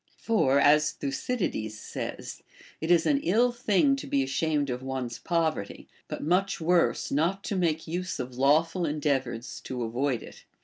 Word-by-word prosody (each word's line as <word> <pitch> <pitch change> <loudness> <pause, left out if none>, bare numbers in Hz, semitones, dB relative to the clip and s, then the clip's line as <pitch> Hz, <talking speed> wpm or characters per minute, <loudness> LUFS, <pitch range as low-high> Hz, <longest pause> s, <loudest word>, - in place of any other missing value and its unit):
For, 140 - +2
as 150 +2 +4
Thucydides 135 - -3
says, - - -6 0.4
It 160 - -3
is 170 -2 +4
an 285 -2 +3
ill 235 +6 +3
thing 240 +3 +2
to - - -7
be 140 -1 +1
ashamed 145 +1 0
of 125 +1 -4
one's 130 -3 -4
poverty, 160 - -2 0.2
but - - -5
much 185 +5 +1
Avorse 170 +1 +1
not 170 +8 0
to 200 - -3
make 165 -4 0
use 180 +1 -3
of 125 0 -5
lawful 155 +7 +2
endeavors 135 -5 -2
to 125 -2 -3
avoid 120 +1 -1
it. - - -13
155 Hz, 160 wpm, -27 LUFS, 135-180 Hz, 0.4 s, as